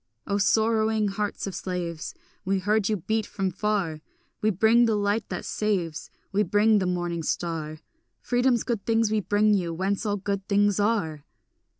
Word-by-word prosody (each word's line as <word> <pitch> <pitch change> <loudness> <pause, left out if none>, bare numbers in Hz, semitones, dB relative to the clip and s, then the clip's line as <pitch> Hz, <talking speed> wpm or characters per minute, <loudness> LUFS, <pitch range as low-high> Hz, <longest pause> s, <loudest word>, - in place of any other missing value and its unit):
O 200 0 0
sorrowing 220 +1 +2
hearts 205 +1 -3
of 195 - -5
slaves, 175 -3 -4 0.3
We 195 +1 +1
heard 205 +2 +1
you 215 - +1
beat 215 +4 -1
from 195 -2 -2
far! 190 -5 -1 0.4
We 215 - +3
bring 220 +4 +4
the 225 -2 +2
light 205 +2 0
that - - -4
saves, 180 -8 -2 0.2
We 205 +1 +2
bring 210 +2 +3
the 185 - -1
morning 175 -2 -2
star; 160 -1 -3 0.4
Freedom's 245 -1 +1
good 230 -5 -2
things 225 -1 +2
we 215 - +2
bring 210 +2 +2
you, 175 -4 0
whence 195 +4 -1
all 205 -2 0
good 200 0 -3
things 205 -1 +2
are. 200 -9 0
205 Hz, 170 wpm, -26 LUFS, 180-215 Hz, 0.4 s, bring